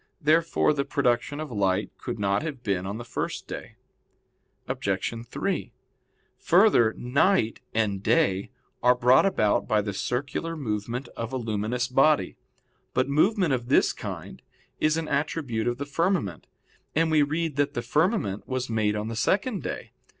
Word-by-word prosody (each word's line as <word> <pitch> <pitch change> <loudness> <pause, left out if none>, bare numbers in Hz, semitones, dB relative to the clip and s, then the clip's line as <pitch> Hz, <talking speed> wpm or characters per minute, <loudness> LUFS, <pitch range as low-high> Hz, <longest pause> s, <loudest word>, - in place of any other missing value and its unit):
Therefore 160 0 +3
the 140 -2 0
production 140 +1 0
of 155 -3 -5
light 100 -2 0
could 120 - -4
not 100 -1 +1
have 145 -6 -5
been 95 -2 -1
on 100 +2 -4
the 120 - -7
first - - -4
day. - - -7 0.9
Obj. - - -1
3: 155 -3 -3 0.7
Further, 170 - +4
night 125 - +2
and 105 -3 0
day 95 0 +2 0.3
are 125 0 +5
brought 125 +7 +5
about 110 - +1
by 110 - +3
the 100 -1 -2
circular 140 - -3
movement 120 0 -3
of 115 +1 -6
a 130 - -2
luminous 115 +1 -1
body. 135 +4 +3 0.6
But 130 +2 +2
movement 180 - +3
of 120 -1 -2
this - - +4
kind - - -7 0.4
is 155 +1 +2
an 165 -1 -2
attribute 140 -6 -1
of 120 0 0
the 140 - -4
firmament, 145 - -1 0.5
and 160 +1 +2
we 155 -1 +5
read 155 +1 -1
that 145 +1 +1
the - - -2
firmament 155 - 0
was 130 -2 -3
made 105 -2 +1
on 105 +1 -3
the 115 - -4
second 195 - 0
day. 115 - -6
125 Hz, 155 wpm, -26 LUFS, 110-155 Hz, 0.9 s, are